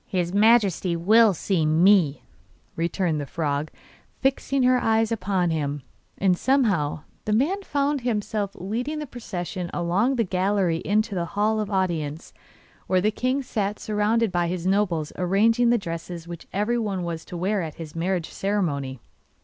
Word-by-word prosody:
'His 180 Hz, -1 st, -1 dB
Majesty 200 Hz, -5 st, +3 dB
will 215 Hz, +6 st, +5 dB
see 175 Hz, 0 st, 0 dB
ME,' 160 Hz, -1 st, +4 dB, 0.5 s
returned 170 Hz, -2 st, -1 dB
the 140 Hz, -, -6 dB
frog, 150 Hz, -2 st, -2 dB, 0.5 s
fixing 270 Hz, 0 st, +1 dB
her 250 Hz, 0 st, +4 dB
eye 225 Hz, 0 st, +3 dB
upon 190 Hz, -6 st, 0 dB
him; 145 Hz, -3 st, -2 dB, 0.3 s
and 190 Hz, -2 st, +3 dB
somehow 195 Hz, -, +1 dB, 0.2 s
the 215 Hz, -, 0 dB
man 310 Hz, -, +1 dB
found 285 Hz, -5 st, 0 dB
himself 210 Hz, -3 st, -2 dB
leading 240 Hz, -, -3 dB
the 300 Hz, -, -4 dB
procession 185 Hz, -8 st, -5 dB
along 190 Hz, +10 st, +1 dB
the 235 Hz, -, +2 dB
gallery 185 Hz, -2 st, +1 dB
into 215 Hz, +1 st, +1 dB
the 175 Hz, -2 st, -1 dB
Hall 215 Hz, +1 st, +2 dB
of 210 Hz, -, -2 dB
Audience, 170 Hz, -6 st, -2 dB, 0.5 s
where 185 Hz, -, +3 dB
the 210 Hz, +4 st, +2 dB
king 255 Hz, +5 st, -1 dB
sat 210 Hz, -4 st, -2 dB
surrounded 215 Hz, +1 st, +1 dB
by 175 Hz, -1 st, +1 dB
his 175 Hz, 0 st, -3 dB
nobles 185 Hz, -6 st, 0 dB
arranging 225 Hz, +6 st, +3 dB
the 240 Hz, -, +4 dB
dresses 170 Hz, -3 st, -6 dB
which 170 Hz, -1 st, -9 dB
everyone 210 Hz, -2 st, -1 dB
was 165 Hz, -1 st, -4 dB
to 175 Hz, -, -7 dB
wear 195 Hz, +3 st, 0 dB
at 160 Hz, -3 st, -5 dB
his 160 Hz, -2 st, -9 dB
marriage 175 Hz, 0 st, -1 dB
ceremony. 145 Hz, -10 st, -2 dB
195 Hz, 155 wpm, -24 LUFS, 170-220 Hz, 0.5 s, will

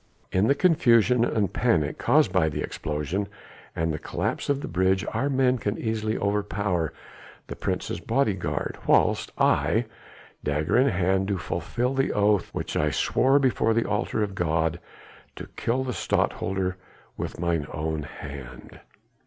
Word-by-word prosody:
In 95 Hz, +3 st, +2 dB
the 140 Hz, -, +4 dB
confusion 125 Hz, -, +4 dB
and 105 Hz, -5 st, 0 dB
panic 80 Hz, -12 st, +1 dB
caused -, -, +3 dB
by 80 Hz, -, +3 dB
the 75 Hz, -, -3 dB
explosion 80 Hz, +7 st, -3 dB, 0.5 s
and 80 Hz, 0 st, 0 dB
the 75 Hz, -, -4 dB
collapse -, -, -3 dB
of 140 Hz, -1 st, +1 dB
the -, -, -5 dB
bridge 95 Hz, +2 st, +1 dB
our 140 Hz, -, 0 dB
men 130 Hz, -2 st, +2 dB
can 105 Hz, 0 st, -2 dB
easily 110 Hz, -1 st, -1 dB
overpower 100 Hz, -4 st, -1 dB, 0.5 s
the -, -, -7 dB
Prince's -, -, -3 dB
bodyguard -, -, -1 dB
whilst -, -, +3 dB
I, 115 Hz, +3 st, +2 dB, 0.6 s
dagger 75 Hz, +1 st, 0 dB
in 130 Hz, +3 st, +5 dB
hand, 95 Hz, -1 st, +1 dB
do 100 Hz, -1 st, 0 dB
fulfil 120 Hz, +10 st, -2 dB
the 135 Hz, 0 st, +1 dB
oath 105 Hz, -2 st, +2 dB
which -, -, -4 dB
I -, -, +2 dB
swore 135 Hz, +2 st, +2 dB
before 125 Hz, -5 st, +2 dB
the 115 Hz, -, +2 dB
altar 105 Hz, +1 st, 0 dB
of 100 Hz, -2 st, -3 dB
God, 80 Hz, -2 st, 0 dB, 0.6 s
to -, -, -7 dB
kill 125 Hz, +3 st, 0 dB
the 130 Hz, -1 st, -3 dB
Stadtholder 95 Hz, -1 st, -1 dB, 0.4 s
with -, -, -5 dB
mine 85 Hz, -3 st, 0 dB
own 80 Hz, 0 st, -2 dB
hand." 70 Hz, -3 st, -9 dB
100 Hz, 150 wpm, -26 LUFS, 80-120 Hz, 0.6 s, in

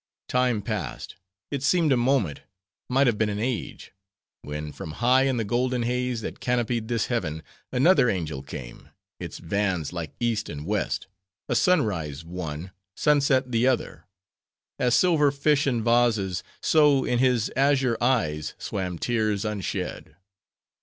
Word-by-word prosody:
"Time 125 Hz, -4 st, +1 dB
passed; 100 Hz, -, -4 dB, 0.4 s
it 140 Hz, -2 st, -2 dB
seemed 155 Hz, +1 st, +3 dB
a -, -, +5 dB
moment, 120 Hz, -, +1 dB, 0.5 s
might 135 Hz, +2 st, +3 dB
have 115 Hz, -5 st, +1 dB
been 110 Hz, -1 st, +2 dB
an 105 Hz, -, -3 dB
age; 115 Hz, +1 st, -4 dB, 0.5 s
when 75 Hz, +1 st, -5 dB
from 75 Hz, -, -8 dB
high 125 Hz, +5 st, +3 dB
in 130 Hz, -2 st, +1 dB
the 115 Hz, -, 0 dB
golden 125 Hz, +3 st, 0 dB
haze 125 Hz, 0 st, -1 dB
that -, -, -6 dB
canopied 120 Hz, -2 st, -1 dB
this 115 Hz, -2 st, 0 dB
heaven, 80 Hz, -10 st, -2 dB, 0.3 s
another 130 Hz, 0 st, +4 dB
angel 80 Hz, -8 st, -2 dB
came; 65 Hz, -3 st, -9 dB, 0.3 s
its 85 Hz, -2 st, -6 dB
vans 90 Hz, -2 st, -1 dB
like 85 Hz, -3 st, -5 dB
East 115 Hz, -3 st, -1 dB
and 75 Hz, +1 st, -6 dB
West; 105 Hz, +2 st, -1 dB, 0.4 s
a -, -, 0 dB
sunrise 85 Hz, -, +1 dB
one, 85 Hz, 0 st, -6 dB, 0.3 s
sunset 140 Hz, -3 st, +2 dB
the 120 Hz, +2 st, +2 dB
other. 130 Hz, -2 st, -1 dB, 0.7 s
As 125 Hz, -1 st, +3 dB
silver 160 Hz, -5 st, +4 dB
fish 145 Hz, +1 st, +1 dB
in 120 Hz, -4 st, 0 dB
vases, 110 Hz, -6 st, +2 dB, 0.2 s
so, 150 Hz, -4 st, +4 dB
in 120 Hz, -, +1 dB
his 125 Hz, -4 st, +2 dB
azure 135 Hz, -2 st, +3 dB
eyes 80 Hz, -, 0 dB
swam 90 Hz, -3 st, -4 dB
tears 110 Hz, -1 st, 0 dB
unshed. 105 Hz, -4 st, -4 dB
115 Hz, 145 wpm, -25 LUFS, 90-130 Hz, 0.7 s, a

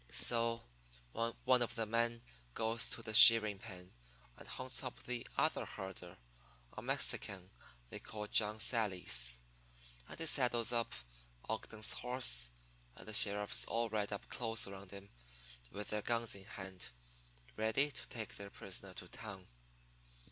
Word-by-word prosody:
"So 115 Hz, -, +2 dB, 0.5 s
one 120 Hz, -, 0 dB
of 120 Hz, -, -2 dB
the 115 Hz, -, -2 dB
men 115 Hz, +1 st, -2 dB, 0.3 s
goes 115 Hz, +1 st, +1 dB
to 115 Hz, -, -1 dB
the 110 Hz, -, -6 dB
shearing 110 Hz, -2 st, +9 dB
pen 90 Hz, -4 st, -12 dB, 0.4 s
and -, -, -14 dB
hunts 130 Hz, +1 st, -3 dB
up 130 Hz, -, -8 dB
the 125 Hz, -1 st, -6 dB
other -, -, +1 dB
herder, 95 Hz, -2 st, -9 dB, 0.6 s
a -, -, -7 dB
Mexican 95 Hz, -2 st, -1 dB, 0.4 s
they -, -, -7 dB
call 105 Hz, -1 st, -8 dB
John 105 Hz, 0 st, +2 dB
Sallies, 90 Hz, -, +2 dB, 0.7 s
and -, -, -9 dB
he 165 Hz, -, -1 dB
saddles 120 Hz, -5 st, +3 dB, 0.7 s
Ogden's 110 Hz, 0 st, -2 dB
horse, 125 Hz, -, +1 dB, 0.5 s
and -, -, -14 dB
the 110 Hz, -, -6 dB
sheriffs 105 Hz, -1 st, +5 dB
all 115 Hz, 0 st, -2 dB
ride 105 Hz, -1 st, -3 dB
up 100 Hz, -, -6 dB
close 115 Hz, -1 st, -2 dB
around 100 Hz, -1 st, -11 dB
him 100 Hz, +1 st, -12 dB, 0.6 s
with 105 Hz, +7 st, -8 dB
their 105 Hz, 0 st, -3 dB
guns 115 Hz, +1 st, -1 dB
in 95 Hz, -1 st, -11 dB
hand, 95 Hz, -, -9 dB, 0.7 s
ready 110 Hz, +7 st, +1 dB
to -, -, -7 dB
take 115 Hz, -4 st, -7 dB
their 100 Hz, 0 st, -9 dB
prisoner 95 Hz, -1 st, -8 dB
to 90 Hz, -, -6 dB
town. 95 Hz, -2 st, -10 dB
110 Hz, 140 wpm, -35 LUFS, 100-115 Hz, 0.7 s, shearing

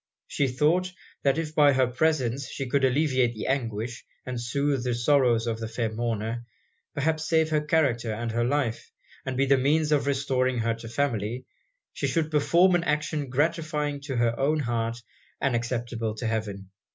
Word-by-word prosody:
She 140 Hz, -, 0 dB
thought, 155 Hz, +8 st, +1 dB, 0.3 s
that 140 Hz, +1 st, +2 dB
if 155 Hz, -2 st, -3 dB
by 145 Hz, -2 st, +5 dB
her 130 Hz, -1 st, +3 dB
presence 130 Hz, -1 st, 0 dB
she 135 Hz, -, -4 dB
could 135 Hz, +2 st, +1 dB
alleviate 130 Hz, -3 st, +2 dB
the 110 Hz, -, -5 dB
anguish, 120 Hz, -3 st, -2 dB, 0.2 s
and 125 Hz, -2 st, -4 dB
soothe 140 Hz, +1 st, 0 dB
the 125 Hz, -1 st, 0 dB
sorrows 120 Hz, -2 st, +3 dB
of 115 Hz, -1 st, -2 dB
the 115 Hz, -, -4 dB
fair 115 Hz, 0 st, -2 dB
mourner, 115 Hz, 0 st, -2 dB, 0.5 s
perhaps 155 Hz, +2 st, 0 dB
save 160 Hz, -1 st, +2 dB
her 150 Hz, -1 st, +2 dB
character 140 Hz, -7 st, +1 dB
and 115 Hz, +2 st, -3 dB
her 120 Hz, +1 st, 0 dB
life, 125 Hz, -2 st, -1 dB, 0.4 s
and 130 Hz, -1 st, -2 dB
be 135 Hz, -, +3 dB
the 135 Hz, 0 st, +4 dB
means 150 Hz, +3 st, +2 dB
of 145 Hz, -2 st, +2 dB
restoring 130 Hz, -2 st, +1 dB
her 115 Hz, 0 st, +1 dB
to 115 Hz, 0 st, -9 dB
her -, -, -9 dB
family, 120 Hz, -3 st, -1 dB, 0.5 s
she -, -, -2 dB
should 160 Hz, -2 st, 0 dB
perform 170 Hz, +5 st, +4 dB
an 175 Hz, -1 st, +2 dB
action 150 Hz, -2 st, -1 dB
gratifying 150 Hz, +1 st, -1 dB
to 140 Hz, -2 st, -5 dB
her 120 Hz, -1 st, +2 dB
own 150 Hz, +3 st, +2 dB
heart, 115 Hz, -2 st, -1 dB, 0.4 s
and 135 Hz, -3 st, +1 dB
acceptable 120 Hz, -2 st, -2 dB
to 120 Hz, -, -5 dB
heaven. 105 Hz, -4 st, -3 dB
130 Hz, 180 wpm, -26 LUFS, 115-150 Hz, 0.5 s, by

